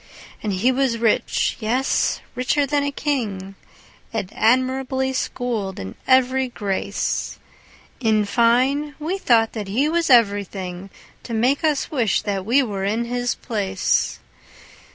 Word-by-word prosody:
And 210 Hz, -, -2 dB
he 200 Hz, +8 st, +2 dB
was 260 Hz, -2 st, +1 dB
rich, 225 Hz, -1 st, +1 dB
yes, 245 Hz, +4 st, 0 dB
richer 270 Hz, +3 st, +1 dB
than 285 Hz, +1 st, 0 dB
a 285 Hz, -, -1 dB
king, 215 Hz, -10 st, -3 dB, 0.6 s
And 215 Hz, -4 st, -4 dB
admirably 260 Hz, +2 st, +1 dB
schooled 235 Hz, -7 st, -3 dB
in 95 Hz, 0 st, -6 dB
every 260 Hz, 0 st, +3 dB
grace: 200 Hz, -3 st, -2 dB, 0.6 s
In 220 Hz, -4 st, +2 dB
fine, 255 Hz, +7 st, +2 dB
we 335 Hz, +6 st, -3 dB
thought 225 Hz, -8 st, +3 dB
that 210 Hz, -3 st, -5 dB
he 245 Hz, +9 st, +1 dB
was 335 Hz, +1 st, 0 dB
everything 200 Hz, -5 st, +1 dB, 0.3 s
To 230 Hz, -, -5 dB
make 255 Hz, +7 st, +1 dB
us 300 Hz, -3 st, 0 dB
wish 235 Hz, -, +1 dB
that 200 Hz, -2 st, -3 dB
we 270 Hz, +4 st, +4 dB
were 200 Hz, -5 st, -4 dB
in 220 Hz, +4 st, 0 dB
his 245 Hz, 0 st, -1 dB
place. 195 Hz, -4 st, -1 dB
235 Hz, 135 wpm, -22 LUFS, 205-265 Hz, 0.6 s, we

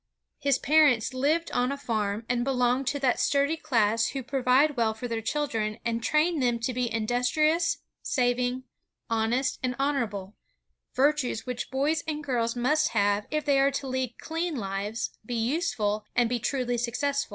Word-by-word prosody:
His 280 Hz, -3 st, +2 dB
parents 280 Hz, -6 st, +3 dB
lived 300 Hz, +6 st, 0 dB
on 250 Hz, +2 st, +1 dB
a 280 Hz, -, -3 dB
farm, 220 Hz, -5 st, -2 dB
and 240 Hz, -1 st, 0 dB
belonged 250 Hz, 0 st, +1 dB
to 285 Hz, -, 0 dB
that 255 Hz, -3 st, +2 dB
sturdy 285 Hz, +2 st, +2 dB
class 230 Hz, -7 st, +1 dB
who 270 Hz, -2 st, -4 dB
provide 270 Hz, +3 st, +2 dB
well 225 Hz, -3 st, +1 dB
for 245 Hz, +3 st, -5 dB
their 230 Hz, -1 st, -3 dB
children, 225 Hz, -5 st, -2 dB
and 230 Hz, 0 st, -1 dB
train 310 Hz, +5 st, +2 dB
them 245 Hz, -3 st, +2 dB
to 250 Hz, +2 st, -1 dB
be 245 Hz, -1 st, -1 dB
industrious, 250 Hz, +9 st, +1 dB, 0.2 s
saving, 250 Hz, 0 st, 0 dB, 0.5 s
honest, 230 Hz, +4 st, 0 dB
and 250 Hz, -1 st, -1 dB
honorable, 230 Hz, -8 st, -2 dB, 0.3 s
— -, -, -53 dB
virtues 275 Hz, -3 st, +1 dB
which 250 Hz, -1 st, -4 dB
boys 290 Hz, +4 st, 0 dB
and 300 Hz, -1 st, -3 dB
girls 235 Hz, -4 st, -1 dB
must 300 Hz, +6 st, +1 dB
have, 205 Hz, +1 st, +2 dB
if 305 Hz, 0 st, -2 dB
they 280 Hz, -2 st, +3 dB
are 275 Hz, +1 st, +4 dB
to 275 Hz, 0 st, -4 dB
lead 255 Hz, -2 st, -2 dB
clean 330 Hz, 0 st, -3 dB
lives, 205 Hz, +1 st, -3 dB
be 240 Hz, +3 st, -4 dB
useful, 225 Hz, -5 st, 0 dB
and 240 Hz, -2 st, +3 dB
be 245 Hz, 0 st, 0 dB
truly 245 Hz, 0 st, -1 dB
successful. 275 Hz, +4 st, -1 dB
250 Hz, 170 wpm, -27 LUFS, 230-285 Hz, 0.5 s, are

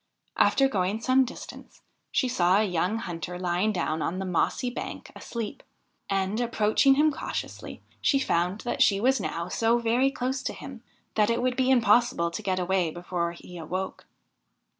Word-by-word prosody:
After 270 Hz, -, +4 dB
going 200 Hz, -3 st, -1 dB
some 255 Hz, +3 st, +3 dB
distance 245 Hz, -, -10 dB, 0.3 s
she 260 Hz, -, +1 dB
saw 185 Hz, -6 st, +3 dB
a 215 Hz, -, +3 dB
young 185 Hz, +2 st, 0 dB
hunter 175 Hz, -4 st, -5 dB
lying 180 Hz, +4 st, 0 dB
down 160 Hz, -5 st, -1 dB
on 180 Hz, -, -2 dB
the 190 Hz, -, -3 dB
mossy 190 Hz, +7 st, 0 dB
bank -, -, -7 dB
asleep, 230 Hz, -3 st, -6 dB, 0.5 s
and, 195 Hz, +3 st, 0 dB
approaching 235 Hz, +3 st, +3 dB
him 305 Hz, +2 st, +4 dB
cautiously, 300 Hz, -, -6 dB, 0.2 s
she 275 Hz, -, +3 dB
found 180 Hz, -5 st, 0 dB
that 240 Hz, -, -3 dB
she 195 Hz, -1 st, +5 dB
was 260 Hz, +4 st, +3 dB
now 170 Hz, +1 st, -3 dB
so 230 Hz, +5 st, +2 dB
very 240 Hz, +3 st, +2 dB
close 260 Hz, 0 st, -2 dB
to -, -, -3 dB
him -, -, -9 dB, 0.3 s
that 210 Hz, 0 st, +2 dB
it 235 Hz, 0 st, +1 dB
would 250 Hz, 0 st, 0 dB
be 260 Hz, 0 st, +1 dB
impossible 240 Hz, -8 st, +3 dB
to 170 Hz, -, -5 dB
get 190 Hz, -3 st, -1 dB
away 180 Hz, -1 st, +1 dB
before 175 Hz, 0 st, -3 dB
he 175 Hz, 0 st, -11 dB
awoke. 185 Hz, +4 st, -5 dB
210 Hz, 170 wpm, -27 LUFS, 180-245 Hz, 0.5 s, she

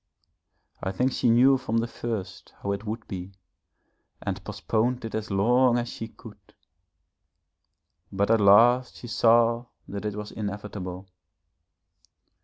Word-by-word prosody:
I 95 Hz, -, -2 dB
think 125 Hz, +7 st, 0 dB
she 120 Hz, -, +1 dB
knew 130 Hz, +3 st, +5 dB
from 115 Hz, -3 st, -2 dB
the 115 Hz, -, +1 dB
first 110 Hz, -5 st, -6 dB
how 100 Hz, -, -1 dB
it 100 Hz, +2 st, -4 dB
would 110 Hz, +2 st, -5 dB
be 95 Hz, 0 st, -7 dB, 0.9 s
and -, -, -4 dB
postponed 120 Hz, +2 st, -1 dB
it 115 Hz, -, -6 dB
as 110 Hz, -1 st, -3 dB
long 120 Hz, +5 st, +3 dB
as 120 Hz, 0 st, -2 dB
she 115 Hz, -, -6 dB
could. -, -, -16 dB, 1.6 s
But 100 Hz, +2 st, +1 dB
at 115 Hz, -1 st, +4 dB
last 120 Hz, +5 st, +5 dB
she -, -, -11 dB
saw 115 Hz, +1 st, +3 dB, 0.2 s
that 100 Hz, +1 st, -6 dB
it 105 Hz, -1 st, -2 dB
was 105 Hz, 0 st, -6 dB
inevitable.... 100 Hz, -3 st, -6 dB
110 Hz, 135 wpm, -26 LUFS, 100-120 Hz, 1.6 s, knew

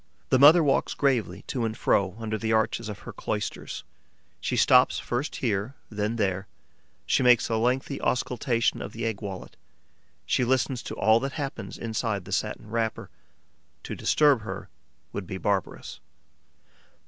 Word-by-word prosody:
The 130 Hz, -, +4 dB
mother 155 Hz, +5 st, +8 dB
walks 140 Hz, -2 st, +1 dB
gravely 115 Hz, -9 st, 0 dB
to 125 Hz, -, -2 dB
and 110 Hz, 0 st, -2 dB
fro 95 Hz, -1 st, +1 dB
under 110 Hz, -1 st, -3 dB
the 110 Hz, +1 st, -2 dB
arches 110 Hz, 0 st, +1 dB
of 105 Hz, -, -7 dB
her -, -, -7 dB
cloisters, -, -, -4 dB, 0.6 s
she -, -, -2 dB
stops -, -, +5 dB
first 125 Hz, +5 st, -3 dB
here, 110 Hz, +2 st, -1 dB, 0.2 s
then 105 Hz, +2 st, -1 dB
there; 95 Hz, -3 st, -1 dB, 0.6 s
she -, -, +2 dB
makes 125 Hz, -2 st, +5 dB
a 115 Hz, -, +1 dB
lengthy 130 Hz, +4 st, 0 dB
auscultation 125 Hz, -2 st, 0 dB
of -, -, -6 dB
the 115 Hz, +1 st, -4 dB
egg 110 Hz, -3 st, -2 dB
wallet; 95 Hz, -3 st, -7 dB, 0.7 s
she -, -, +1 dB
listens 130 Hz, 0 st, +1 dB
to -, -, -6 dB
all 110 Hz, +3 st, +4 dB
that 135 Hz, +1 st, -3 dB
happens 140 Hz, -4 st, -5 dB
inside 110 Hz, -3 st, -2 dB
the -, -, -10 dB
satin 105 Hz, -, -2 dB
wrapper. 115 Hz, -1 st, -2 dB, 0.7 s
To -, -, -5 dB
disturb 145 Hz, -6 st, +3 dB
her 105 Hz, -, -7 dB, 0.4 s
would 100 Hz, -3 st, -5 dB
be 95 Hz, -, -4 dB
barbarous. 100 Hz, -1 st, -2 dB
115 Hz, 155 wpm, -27 LUFS, 105-130 Hz, 0.7 s, mother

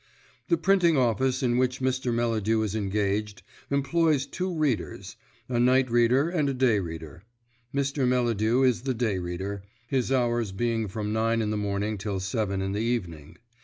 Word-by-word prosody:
The 340 Hz, -, +3 dB
printing 180 Hz, -, +3 dB
office 130 Hz, +2 st, +1 dB
in 120 Hz, -1 st, +2 dB
which 125 Hz, 0 st, 0 dB
Mr. 130 Hz, -1 st, 0 dB
Melladew 115 Hz, -2 st, +1 dB
is 105 Hz, -2 st, -2 dB
engaged 105 Hz, 0 st, -1 dB, 0.3 s
employs 140 Hz, 0 st, +2 dB
two 185 Hz, +5 st, -3 dB
readers, 155 Hz, -8 st, -2 dB, 0.3 s
a 120 Hz, -2 st, -1 dB
night 130 Hz, +1 st, +3 dB
reader 120 Hz, +5 st, +3 dB
and 160 Hz, -5 st, 0 dB
a 135 Hz, -, -2 dB
day 125 Hz, -5 st, +3 dB
reader. 80 Hz, -3 st, -7 dB, 0.5 s
Mr. 140 Hz, -1 st, 0 dB
Melladew 120 Hz, -1 st, +2 dB
is 125 Hz, -3 st, +2 dB
the 130 Hz, 0 st, -2 dB
day 110 Hz, -5 st, 0 dB
reader, 95 Hz, +3 st, -4 dB, 0.3 s
his 130 Hz, -1 st, 0 dB
hours 120 Hz, -4 st, +1 dB
being 115 Hz, +2 st, -1 dB
from 105 Hz, +2 st, -3 dB
nine 115 Hz, +1 st, +1 dB
in 110 Hz, -1 st, -1 dB
the -, -, -1 dB
morning 105 Hz, 0 st, -2 dB
till 100 Hz, -1 st, -3 dB
seven 100 Hz, 0 st, -2 dB
in 95 Hz, -, -2 dB
the 100 Hz, -, -2 dB
evening. 90 Hz, -9 st, -3 dB
115 Hz, 165 wpm, -27 LUFS, 105-130 Hz, 0.5 s, The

